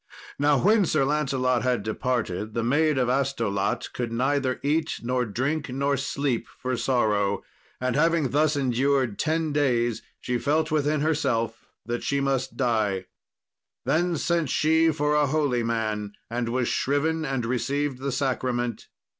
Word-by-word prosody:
Now 145 0 +4
when 205 - +4
Sir 145 -3 +2
Lancelot 135 -4 +1
had 125 -5 0
departed, 110 -2 -2
the 115 - 0
Maid 150 +4 +2
of 125 -2 +2
Astolat 120 -5 -1
could 120 -2 -3
neither 130 +2 0
eat, 155 +3 0
nor 125 +1 0
drink, 135 +7 -2
not 140 +1 0
sleep 140 -3 -1
for 130 0 -2
sorrow; 105 -6 +1 0.4
and 125 -1 -1
having 165 -2 +2
thus 150 +2 +2
endured 130 -4 +1
ten 160 -1 0
days, 120 -6 +1 0.2
she 125 -1 -2
felt 155 +4 +1
within 150 -1 +1
herself 145 -8 0 0.2
that 120 +2 -3
she 140 - 0
must 135 -2 -1
die. 110 -7 0 0.8
Then 175 +1 +1
sent 170 -2 0
she 160 +3 +3
for 150 -1 0
a 150 -1 +3
holy 140 -4 +1
man, 110 -3 -2 0.2
and 120 0 -1
was 125 0 0
shriven 155 +4 0
and 135 -5 -2
received 135 +3 -1
the 140 +1 -2
sacrament. 125 -3 -1
135 Hz, 145 wpm, -25 LUFS, 120-150 Hz, 0.8 s, Now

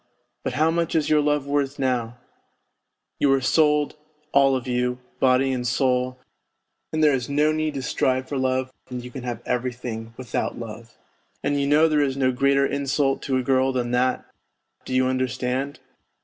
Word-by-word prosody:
But - - -2
how 155 +2 +2
much 170 0 -1
is 155 -2 +1
your 150 -1 +5
love 150 -1 +1
worth 140 0 -1
now? 125 -3 -1 1.0
You 140 - +3
are 135 - +3
sold, 150 +3 +2 0.3
all 135 -1 +4
of 130 - -3
you, 125 0 0 0.2
body 130 +1 +3
and 125 -1 -2
soul, 125 0 +1 0.7
and 155 0 0
there 150 -2 +5
is 125 -2 -2
no 150 +2 +3
need 155 -1 -1
to 135 - -3
strive 130 +1 0
for 140 - -3
love 130 0 0 0.2
when 125 -1 -5
you 125 0 -9
can 130 - -7
have 120 -1 -5
every 125 +1 -1
thing 115 -2 -7
without 125 -5 -3
love. 115 0 -9 0.5
And 145 -1 +1
you 140 - 0
know 150 +3 +5
there 155 -2 +2
is 135 -1 0
no 130 -1 +2
greater 140 +2 +3
insult 140 0 0
to 130 -2 0
a 130 - -1
girl 130 +1 +2
than 125 -2 -2
that, 125 +1 +1 0.6
do 130 - -3
you 130 0 +3
understand 130 +1 -1
130 Hz, 185 wpm, -24 LUFS, 125-140 Hz, 1.0 s, your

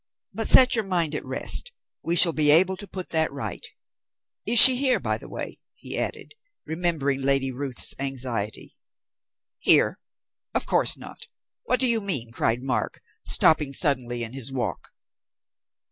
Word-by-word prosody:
But 225 +3 -4
set 255 0 +6
your 225 - -1
mind 175 -5 -3
at 150 - -6
rest; 485 - +1 0.3
we 170 - -3
shall 170 -1 +6
be 150 -1 +1
able 180 +5 +4
to 205 +2 -11
put 185 0 -9
that 160 -1 -2
right. 140 0 -8 0.8
Is 235 +2 +3
she 260 +2 +12
here, 260 -1 -1
by - - -4
the - - -14
way?" - - -8 0.2
he - - -8
added, - - -6 0.3
remembering 160 -5 -4
Lady 135 -1 -1
Ruth's 130 0 -4
anxiety. 125 -6 -6 0.8
"Here, - - +1 0.6
of - - -2
course - - +2
not! - - -13 0.4
What 250 - -1
do 260 - +1
you 230 -2 +1
mean?" 140 - -5
cried 115 +1 -3
Mark, 125 -5 -5 0.2
stopping 150 -3 +2
suddenly 125 -4 -1
in 115 +1 -6
his 135 -1 -6
walk. 120 -9 -7
150 Hz, 155 wpm, -22 LUFS, 130-185 Hz, 0.8 s, she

